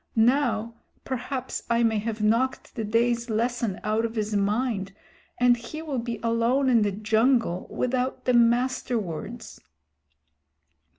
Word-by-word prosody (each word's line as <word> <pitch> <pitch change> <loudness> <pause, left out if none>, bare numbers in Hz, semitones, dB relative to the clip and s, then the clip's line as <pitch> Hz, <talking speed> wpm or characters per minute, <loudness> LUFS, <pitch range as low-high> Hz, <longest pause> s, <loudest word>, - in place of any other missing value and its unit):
Now 230 -1 +2 0.3
perhaps 260 0 -4
I 235 0 +3
may 220 -2 +2
have 215 0 -3
knocked 230 +5 +1
the 225 - -4
day's 235 +2 +1
lesson 230 -2 -1
out 215 +2 0
of 230 0 -3
his 215 -1 -1
mind, 205 -1 0 0.5
and 245 0 +5
he 240 +7 -8
will 285 -5 -2
be 235 0 -4
alone 235 +4 +2
in 235 -3 +4
the 205 -1 +1
jungle 220 -1 +1
without 255 +1 -2
the 250 - +2
Master 240 +1 +2
Words." 210 +4 -6
235 Hz, 135 wpm, -26 LUFS, 215-250 Hz, 0.5 s, and